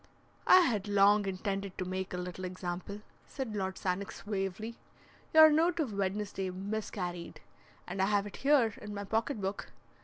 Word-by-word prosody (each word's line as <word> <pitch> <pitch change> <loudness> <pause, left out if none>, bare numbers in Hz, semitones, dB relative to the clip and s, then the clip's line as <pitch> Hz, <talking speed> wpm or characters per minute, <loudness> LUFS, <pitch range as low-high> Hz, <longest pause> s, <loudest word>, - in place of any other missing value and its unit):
"I 370 - +9
had 215 - 0
long 205 0 +4
intended 195 0 -3
to 185 - -2
make 185 +1 -3
a 180 - -3
little 180 +1 -5
example," 185 +2 -5 0.3
said 260 -6 -5
Lord 190 -2 -2
Sannox, 190 +1 -3
suavely. 205 +3 -3 0.5
"Your 315 0 +9
note 330 +3 +2
of 270 -9 -1
Wednesday 195 0 -2
miscarried, 185 -2 -5 0.5
and 195 - -3
I 190 - +3
have 205 -1 +2
it 205 - -8
here 270 -6 +3
in 210 0 -7
my 200 - -4
pocket 225 +4 -1
book. 195 +1 -4
200 Hz, 160 wpm, -32 LUFS, 190-220 Hz, 0.5 s, I